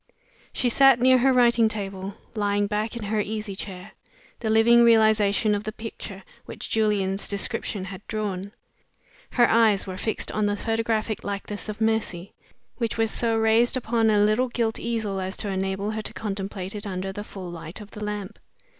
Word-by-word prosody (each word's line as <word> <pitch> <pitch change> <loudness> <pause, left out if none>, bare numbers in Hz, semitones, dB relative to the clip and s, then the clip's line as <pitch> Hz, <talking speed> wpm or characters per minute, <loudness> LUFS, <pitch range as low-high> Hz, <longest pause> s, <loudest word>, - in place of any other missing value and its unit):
She 255 - 0
sat 270 +1 +6
near 255 +1 +5
her 265 +2 +4
writing 235 -3 +4
table, 195 -2 -5 0.2
lying 205 -2 +1
back 210 +2 -2
in 230 - -6
her 210 +1 0
easy 210 -1 -4
chair 190 0 -7 0.5
the 220 - -2
living 225 +2 +6
realization 215 -2 +4
of 205 0 -1
the 215 - -4
picture 210 -3 -8 0.2
which - - -7
Julian's 205 -3 +1
description 200 -1 -2
had 190 +1 -9
drawn. 200 -3 -3 0.8
Her 240 -1 +5
eyes 220 -3 +4
were 185 -1 -6
fixed 220 - -2
on 210 -1 0
a 205 - 0
photographic 225 0 -1
likeness 205 +1 -4
of 215 - -5
Mercy, 220 -5 -1 0.4
which 230 -2 -2
was 225 -1 +1
so 230 -1 +1
raised 225 +3 +3
upon 225 -2 +1
a 210 - +4
little 215 +5 +3
gilt 230 -2 -1
easel 220 -4 -2
as 185 +1 -4
to 205 - -1
enable 195 +2 -2
her 220 0 -3
to - - -7
contemplate 195 -2 -4
it 210 0 -5
under 190 0 -3
the 205 +2 -6
full 185 -4 -8
light 165 +1 -7
of 210 -1 -11
the 210 - -7
lamp. 210 -2 -5
215 Hz, 180 wpm, -25 LUFS, 200-225 Hz, 0.8 s, sat